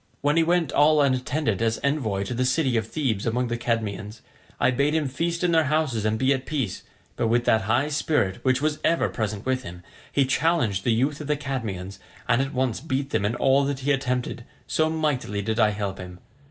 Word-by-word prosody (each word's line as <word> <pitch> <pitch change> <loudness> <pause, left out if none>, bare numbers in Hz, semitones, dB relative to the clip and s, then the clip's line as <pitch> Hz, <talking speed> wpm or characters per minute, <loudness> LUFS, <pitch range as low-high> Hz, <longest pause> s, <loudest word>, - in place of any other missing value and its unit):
When 145 +1 +2
he 165 - +5
went 165 -2 +1
all 150 +1 +4
unattended 130 -4 +1
as 115 0 +1
envoy 125 -9 0
to 100 - -4
the 125 +2 0
city 130 0 +1
of 110 -2 0
Thebes 115 -7 -1
among 120 +2 0
the 120 - -1
Cadmeans, 110 -2 -3 0.4
I 125 - +3
bade 140 +4 +1
him 155 -3 +1
feast 170 +6 -2
in 175 - +3
their 160 -1 +4
houses 140 -7 0
and 110 0 +1
be 130 +3 +3
at 130 -1 -4
peace; 135 -11 -2 0.3
but 115 - 0
with 120 +1 +2
that 110 -3 +3
high 125 +6 +2
spirit 145 - 0
which 130 +1 +2
was 155 -1 0
ever 170 - +2
present 105 -2 -3
with 130 0 0
him, 90 -6 -10 0.3
he 140 - +3
challenged 130 - +1
the 120 - +3
youth 135 +6 0
of 150 - -6
the 150 -1 +1
Cadmeans, 110 -10 -5 0.3
and 120 - +3
at 135 +1 -2
once 130 -4 -1
beat 140 -2 -2
them 100 - 0
in 110 +3 0
all 135 +2 +3
that 140 -1 -3
he 145 +2 +1
attempted, 125 -3 -1 0.2
so 155 0 +1
mightily 145 -10 -1
did 110 +2 -1
I 110 -2 +5
help 100 -2 -4
him. 90 -1 -8
130 Hz, 220 wpm, -25 LUFS, 110-145 Hz, 0.4 s, he